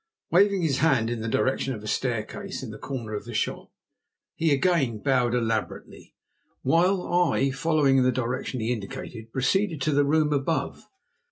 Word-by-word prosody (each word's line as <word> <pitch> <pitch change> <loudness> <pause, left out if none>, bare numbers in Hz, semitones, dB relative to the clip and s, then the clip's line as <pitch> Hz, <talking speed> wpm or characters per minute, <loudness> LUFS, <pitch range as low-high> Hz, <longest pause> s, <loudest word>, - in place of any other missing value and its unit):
Waving 195 +1 +4
his 145 -5 +1
hand 130 -8 +2
in 120 -2 -3
the 115 - -3
direction 130 +2 0
of 105 - -10
a - - -7
staircase 125 - -3
in 120 - -6
the 105 - -10
corner 120 -6 -5
of 105 0 -4
the 120 -2 -7
shop - - -2 0.6
he 160 -1 +1
again 140 -6 +2
bowed 125 0 +1
elaborately, 115 -3 -3 0.5
while 180 +6 +3
I, 175 -6 +2
following 140 -2 +2
the 130 0 +3
direction 125 +1 -3
he 115 +3 0
indicated, 110 +1 -7
proceeded 160 - 0
to 155 - +1
the 145 0 +3
room 150 +1 +2
above. 140 -1 -2
135 Hz, 165 wpm, -26 LUFS, 115-160 Hz, 0.6 s, Waving